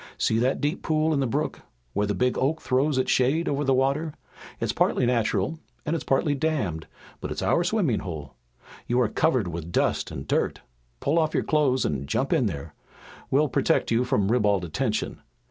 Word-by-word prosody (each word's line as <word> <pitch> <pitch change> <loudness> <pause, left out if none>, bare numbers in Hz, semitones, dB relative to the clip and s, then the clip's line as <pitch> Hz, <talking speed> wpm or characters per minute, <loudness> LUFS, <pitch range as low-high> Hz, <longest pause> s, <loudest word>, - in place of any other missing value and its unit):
See 110 - +1
that 130 +3 +1
deep 150 +4 -1
pool 155 0 +1
in 145 - +1
the 135 - +1
brook, 115 - -2 0.3
where 105 - 0
the 105 - -1
big 125 +5 +1
oak 145 +5 0
throws 135 +2 +1
its 130 - +1
shade 140 +7 +2
over 145 0 0
the 135 - +2
water? 140 +4 0 0.4
It's - - -1
partly - - +2
natural 115 +3 0 0.3
and 160 +1 0
it's 165 - -3
partly 140 +2 +1
dammed, 130 - -1 0.3
but - - -5
it's - - -3
our 175 - +2
swimming 175 - +1
hole. 80 -7 -7 0.5
You 120 +1 +2
are 120 - +3
covered 125 - +1
with 85 0 -6
dust - - +1
and - - -7
dirt. - - 0 0.4
Pull 155 +4 +2
off 155 -1 0
your - - +2
clothes 140 -4 +2
and 70 -2 -2
jump 135 - 0
in 135 -9 +3
there. 70 -7 -6 0.6
We'll 150 +3 +3
protect - - +1
you 115 +2 +3
from 120 -6 +1
ribald 105 -6 +2
attention. 110 - -2
130 Hz, 195 wpm, -26 LUFS, 105-150 Hz, 0.6 s, are